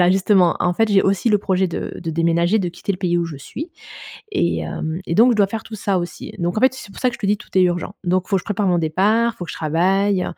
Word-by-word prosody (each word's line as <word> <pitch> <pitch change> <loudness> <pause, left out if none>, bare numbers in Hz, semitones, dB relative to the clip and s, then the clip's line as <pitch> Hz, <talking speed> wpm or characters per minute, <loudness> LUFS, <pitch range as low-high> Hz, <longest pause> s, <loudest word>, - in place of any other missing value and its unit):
voilà 175 0 +5
justement, 190 -1 +3
en 180 - +2
fait 225 +2 +2
j'ai 195 -1 +4
aussi 195 +3 +1
le 210 -2 +4
projet 190 -2 0
de - - -5
de 165 - -3
déménager, 170 +5 +2
de 180 -4 -1
quitter 175 +3 -6
le 180 - -6
pays 175 -2 0
où 170 - 0
je 160 -4 -6
suis 300 - -8 0.6
et 170 - +1
hem, 160 +2 -4
et 170 - -2
donc, 245 +3 +6
je 225 - -1
dois 205 - +4
faire 220 +1 -5
tout 225 - -9
ça 195 -2 0
aussi. 175 0 -6
Donc 175 +3 -1
en - - -1
fait, 260 0 +4
c'est 205 -6 -10
pour - - -11
ça 255 - +3
que - - -9
je - - -9
te 200 - -1
dis, 205 +1 +2
tout - - -15
est 185 - +6
urgent. 175 +1 0
Donc 185 +1 +1
il - - -18
faut 195 - +3
que - - 0
je - - -19
prépare 205 -1 -1
mon 175 - +2
départ, 205 +9 +2
il - - -29
faut 175 - -5
que - - -6
je - - -8
travaille 185 +5 +1
185 Hz, 310 wpm, -20 LUFS, 175-205 Hz, 0.6 s, donc